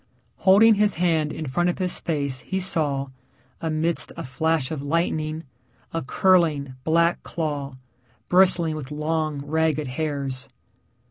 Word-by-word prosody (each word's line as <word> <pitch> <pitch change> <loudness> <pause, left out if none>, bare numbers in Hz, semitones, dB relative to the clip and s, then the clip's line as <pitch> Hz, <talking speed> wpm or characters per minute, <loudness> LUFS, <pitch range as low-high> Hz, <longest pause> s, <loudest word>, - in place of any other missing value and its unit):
Holding 205 +4 +6
his 210 -1 +3
hand 160 -3 +1
in 155 - -5
front 175 +6 0
of 175 - -2
his 185 -2 -1
face 140 -5 -1
he 190 - -3
saw, 145 -7 -1 0.5
amidst 160 +1 +1
a - - -5
flash 160 +1 -1
of 155 -3 -4
lightning, 155 +1 -1 0.5
a 165 - -1
curling, 155 -3 +2
black 170 +2 +2
claw, 145 -5 -4 0.5
bristling 180 -3 +4
with 145 -4 -7
long, 155 -1 -2
ragged 155 -2 0
hairs. 140 -2 -4
155 Hz, 130 wpm, -23 LUFS, 145-170 Hz, 0.5 s, Holding